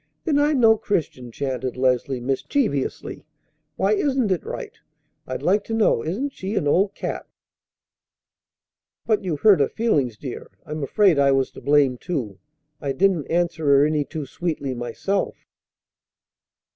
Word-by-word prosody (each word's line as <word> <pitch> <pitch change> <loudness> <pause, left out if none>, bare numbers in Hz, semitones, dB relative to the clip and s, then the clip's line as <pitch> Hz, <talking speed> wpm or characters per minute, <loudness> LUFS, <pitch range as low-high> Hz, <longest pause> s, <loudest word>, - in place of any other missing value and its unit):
"Then 295 -4 +2
I'm 290 -1 +2
no 225 -2 +6
Christian," 150 - -3
chanted 130 0 -3
Leslie 130 0 +1
mischievously. 135 - -2 0.5
"Why 195 +2 +2
isn't 260 -2 +1
it 180 - 0
right, - - -6 0.5
I'd 130 - -5
like 200 +4 +2
to 225 - -3
know? 215 - +2
Isn't 240 - -3
she 195 +3 -5
an 150 - 0
old 190 +7 +2
cat?" - - -5 1.8
"But 215 -2 +1
you 175 -5 -1
hurt 200 0 +5
her 140 - +2
feelings, 140 - 0
dear. 130 0 -7 0.2
I'm 155 -1 -5
afraid 170 +3 +3
I 140 -1 +4
was 135 -1 +1
to - - -12
blame, 140 -4 +3
too; 115 - -4 0.4
I 140 -2 -2
didn't 185 -4 +1
answer 170 -1 0
her 140 0 +6
any 150 -1 +1
too 150 +1 -6
sweetly 145 -2 -3
myself." 120 +12 -2
155 Hz, 145 wpm, -23 LUFS, 135-200 Hz, 1.8 s, no